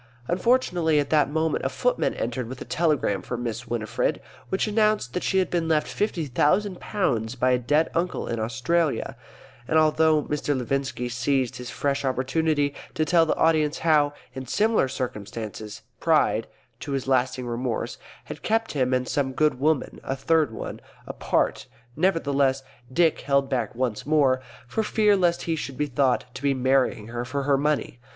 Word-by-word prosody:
Unfortunately 175 -6 +2
at 145 - -2
that 150 -2 +4
moment 160 +1 0
a - - +1
footman - - 0
entered 125 -3 -3
with 130 0 -7
a - - -7
telegram 150 - +1
for 125 - -5
Miss 120 0 -4
Winifred, 115 -1 -1 0.3
which 190 - 0
announced 215 - +1
that 180 - -1
she 190 - 0
had 185 -2 +1
been 170 -2 0
left 155 -2 +2
fifty 195 -6 -2
thousand 180 - +1
pounds 125 - -1
by 130 0 +2
a 125 - +3
dead 150 +6 +2
uncle 175 +2 -1
in 115 - -2
Australia; 120 +6 0 0.5
and 160 - +2
although 155 -1 +4
Mr. 145 -1 -1
Levinski 130 -1 -2
seized 130 0 -1
this 125 0 -6
fresh 140 +3 -1
opportunity 145 +3 0 0.2
to 155 - +1
tell 165 0 +4
the - - +1
audience 155 -2 +2
how 150 -3 +4 0.2
in 130 -1 -7
similar 215 - +2
circumstances 110 -4 -6 0.2
Pride, - - +2 0.3
to 140 - -5
his 135 -1 -2
lasting 130 -1 +1
remorse, 120 -1 -3 0.2
had - - -9
kept 225 +1 0
him 130 -3 +1
and 125 0 -1
some 135 -2 -1
good 150 -2 +1
woman 150 0 0
(a 135 - -2
third 155 0 +2
one) 110 - -6 0.3
apart, - - -1 0.3
nevertheless 140 -6 +1 0.3
Dick 165 +2 +3
held 140 -1 +1
back 120 -4 -1
once 120 -2 -2
more, 140 -4 +3 0.2
for 220 - -1
fear 210 -1 +3
lest 175 -3 +1
he 165 - -1
should 135 -4 -6
be 150 - +1
thought 135 -2 +1
to - - -8
be 140 -1 +1
marrying 130 -4 +1
her 120 +1 -3
for 140 +3 -3
her 140 0 +3
money. 145 -3 -1
140 Hz, 175 wpm, -25 LUFS, 125-160 Hz, 0.5 s, that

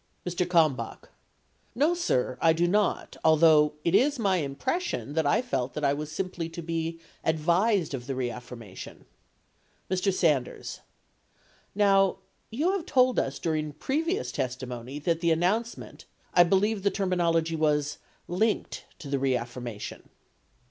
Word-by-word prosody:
Mr. 180 0 -1
Kalmbach. 160 -6 +1 0.7
No, 295 +7 +3
sir; 130 - 0
I 165 -1 +5
do 170 +2 +1
not, 205 +3 0
although 155 -1 +5
it 170 - +1
is 285 +7 +4
my 195 -6 +1
impres 145 - -1
sion 345 - -4
that 160 -2 +1
I 190 - +2
felt 130 - -2
that 150 - -1
I 140 - +3
was 150 +1 -5
simply 180 -3 -3
to 165 +1 -7
be 165 0 -3 0.2
advised 170 +4 +2
of 125 -3 -5
the 135 - -2
reaffir 125 -1 -4
mation. 105 -5 -11 0.9
Mr. 185 +1 +2
Sanders. 150 -9 0 1.0
Now, 195 -2 +4 0.3
you 300 +11 0
have 390 -4 -3
told 255 -3 +3
us 135 0 -2
during 155 -2 -2
previous 325 - -1
testi 130 0 -3
mony 125 +3 -6
that 165 +2 0
the 170 0 +1
announcement 190 +9 -1
— - - -36
I 175 - +7
believe 200 +4 +2
the 200 - +2
terminology 170 -4 +1
was 150 -2 0 0.3
"linked" 210 +5 -1
to 150 - -9
the 140 0 -1
reaffirmation. 120 -4 -3
165 Hz, 150 wpm, -27 LUFS, 145-195 Hz, 1.0 s, I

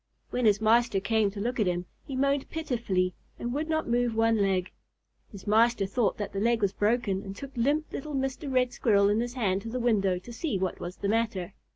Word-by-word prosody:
When 250 -1 0
his 205 -1 +4
master 225 -1 +3
came 220 +1 +2
to 200 +1 -8
look 240 +4 -2
at 210 - +2
him, 175 0 -1 0.2
he 270 - -6
moaned 275 +1 +1
pitifully 225 - -1 0.2
and 240 +1 -3
would 305 +3 -2
not 315 0 0
move 240 -1 +1
one 225 0 +3
leg. 190 -3 +1 0.6
His 200 -4 -11
master 225 0 +3
thought 205 +2 0
that 205 - -4
the 195 - -2
leg 230 +2 +2
was 195 -1 +2
broken, 205 -3 +1
and 195 -1 -8
took 275 +5 -9
limp 285 +6 0
little 295 +1 -4
Mr. 270 +2 -2
Red 250 -1 +2
Squirrel 200 -3 +3
in 210 +2 +2
his 240 +1 -3
hand 195 -6 0
to 225 - -6
the 250 +2 -3
window 200 -6 +2
to 235 +7 -10
see 230 - -2
what 185 -1 -2
was 175 +1 -6
the 200 - -2
matter. 210 -4 -1
225 Hz, 225 wpm, -28 LUFS, 200-245 Hz, 0.6 s, his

